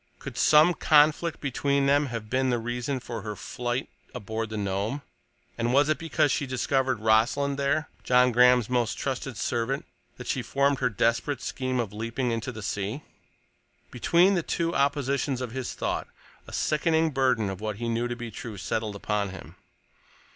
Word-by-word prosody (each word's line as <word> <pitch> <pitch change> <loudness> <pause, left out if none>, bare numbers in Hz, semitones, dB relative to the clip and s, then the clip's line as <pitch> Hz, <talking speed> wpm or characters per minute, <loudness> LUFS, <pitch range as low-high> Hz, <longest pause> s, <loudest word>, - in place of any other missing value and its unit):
Could - - -8
some 155 +3 +5
conflict 155 +1 +3
between 140 0 0
them 145 +1 +3
have 115 -3 -5
been 130 +3 +1
the 120 - +2
reason 120 +3 -3
for 120 -2 -6
her 105 0 -5
flight 120 +4 -3 0.3
aboard 110 -1 -4
the 110 - -5
Nome, 100 +7 -2 0.6
and 120 +2 +1
was 145 +2 +4
it 155 - +1
because 150 -3 +1
she 145 - -1
discovered 130 -1 0
Rossland 120 +6 +2
there—John 140 -3 +2
Graham's 125 -1 +5
most 120 -2 0
trusted 135 -3 -3
servant—that 120 0 -4
she 130 - -1
formed 140 +3 +1
her 125 - +2
desperate 115 +5 0
scheme 130 -1 -2
of 110 -4 -2
leaping 115 +3 -2
into 115 -1 -3
the 110 - -8
sea? 105 +8 -3 0.9
Between 170 - +3
the 180 - +1
two 170 +1 -1
oppositions 140 -2 0
of 125 -3 -4
his 130 0 -4
thought - - -2 0.4
a - - -10
sickening 160 +1 +1
burden 130 -6 +2
of 95 0 -5
what 110 -1 -3
he 120 +3 -4
knew 115 +1 0
to 120 - -3
be 120 -1 -7
true 110 0 -7
settled 105 +2 -3
upon 100 0 -1
him. 95 - -10
125 Hz, 170 wpm, -27 LUFS, 115-140 Hz, 0.9 s, some